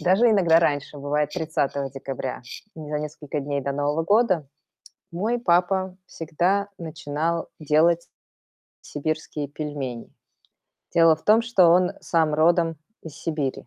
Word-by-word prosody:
Даже 195 +7 +4
иногда 175 -6 +5
раньше 145 -3 -1
бывает, 145 +1 -1
30 140 -3 -2
декабря. 135 -1 -5 0.3
За 150 -2 -4
несколько 150 -1 -5
дней 140 0 -2
до 140 +1 -3
Нового 145 +3 0
года 190 - +2 0.7
мой 215 +8 -1
папа 185 -1 +1
всегда 180 +5 -1
начинал 160 0 -3
делать 165 +3 +2 0.7
сибирские 150 -1 -4
пельмени. 145 -5 -5 0.8
Дело 165 -1 +6
в 155 - -22
том, 220 +2 +4
что 230 -6 +4
он 180 +2 +4
сам 160 -3 +1
родом 165 +1 +3 0.3
из 160 -3 -10
Сибири. 150 -7 -3
160 Hz, 125 wpm, -24 LUFS, 145-175 Hz, 0.8 s, Дело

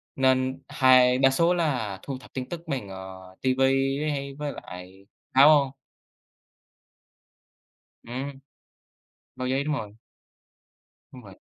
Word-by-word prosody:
nên 130 0 +1
hai 130 -1 +5
đa 135 0 +5
số 170 +6 +2
là 125 - -1
thu 135 -2 -5
thập 130 - -17
tin 130 -1 -5
tức 170 -1 -6
bằng, 130 -9 -4
ờ, 95 -1 -10
ti 130 -1 +2
vi 135 +1 +2
hay 140 -1 -4
với 145 0 -4
lại 90 +2 -11 0.3
báo. 140 -1 +6 2.3
Ừm. 135 +3 -6 1.0
Báo 130 - -4
giấy, 135 +2 0
đúng 150 0 -1
rồi. 105 -6 -6 1.2
Đúng 125 - -12
vậy. 95 -2 -14
130 Hz, 125 wpm, -26 LUFS, 115-140 Hz, 2.3 s, báo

